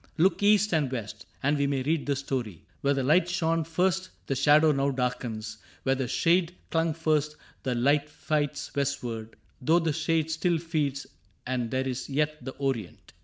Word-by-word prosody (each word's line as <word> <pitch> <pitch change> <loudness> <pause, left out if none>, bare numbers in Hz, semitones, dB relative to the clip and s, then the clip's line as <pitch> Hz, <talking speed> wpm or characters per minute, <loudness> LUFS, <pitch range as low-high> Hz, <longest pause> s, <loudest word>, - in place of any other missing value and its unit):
Look 185 +5 +3
east 210 -1 +4
and 150 -5 +1
west 110 -4 -6 0.2
And 145 +1 +2
we 140 - +2
may 135 -2 0
read 155 +1 0
the 140 - +2
story: 125 -9 -4 0.2
where 140 0 +2
the 135 - 0
light 165 +6 +4
Shone 165 -2 +1
first 185 +3 0 0.2
the - - -1
shade 150 +3 +5
now 140 -3 +3
darkens; 120 -4 -3 0.2
where 135 - +2
the 130 -1 -2
shade 175 +5 +2 0.2
Clung 165 -1 +1
first, 155 -2 +1 0.3
the 130 -3 -1
light 140 +4 +2
fights 150 -1 -2
westward 120 -6 -2
— - - -37
though 160 +7 +4
the 165 -3 +1
shade 160 0 0
Still 165 +2 +1
feeds, 150 -5 -2 0.4
and 125 -2 -1
there 130 +1 -1
is 130 +1 -4
yet 150 0 -1
the 130 +1 -6
Orient. 135 -9 -4
145 Hz, 180 wpm, -28 LUFS, 130-160 Hz, 0.4 s, shade